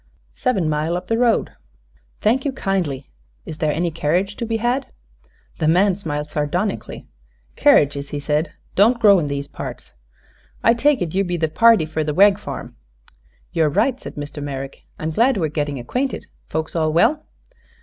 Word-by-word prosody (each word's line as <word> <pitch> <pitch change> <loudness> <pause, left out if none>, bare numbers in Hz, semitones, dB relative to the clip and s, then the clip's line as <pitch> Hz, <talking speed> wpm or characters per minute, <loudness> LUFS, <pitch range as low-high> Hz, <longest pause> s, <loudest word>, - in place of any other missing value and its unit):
"Sev'n 205 - 0
mile 155 +3 0
up 180 - -6
the 225 - 0
road." 240 -2 +2 0.7
"Thank 240 +5 +2
you 280 - -1
kindly. 180 - -2 0.3
Is 155 - -8
there 155 -1 +1
any 170 +3 -1
carriage 170 +6 0
to 235 - -3
be 225 0 0
had?" 245 +4 -1 0.7
The 155 - +1
man 185 +4 +4
smiled 150 -5 -4
sardonically. 175 +7 -2 0.5
"Kerridges," 140 -1 +3
he 145 - -4
said, 150 +2 -1 0.2
"don't 230 +5 +4
grow 200 -4 +6
in 150 - -2
these 140 0 -3
parts. - - -8 0.7
I 230 - +6
take 260 -1 +2
it 160 - -5
you 195 +1 +2
be 175 -2 -2
the 160 -1 +1
party 225 +1 +5
fer 155 0 -2
the 150 -1 -2
Wegg 200 +2 +5
farm." - - -7 0.8
"You're 160 -3 +2
right," 255 - +1
said - - -9
Mr. 145 0 -6
Merrick. 135 -1 -6
"I'm 160 +1 -3
glad 235 +8 +3
we 170 - 0
are - - -2
getting 145 -2 -2
acquainted. 250 - -3 0.2
Folks 160 +2 -3
all 155 -2 +1
well?" 235 - +3
170 Hz, 175 wpm, -21 LUFS, 150-220 Hz, 0.8 s, grow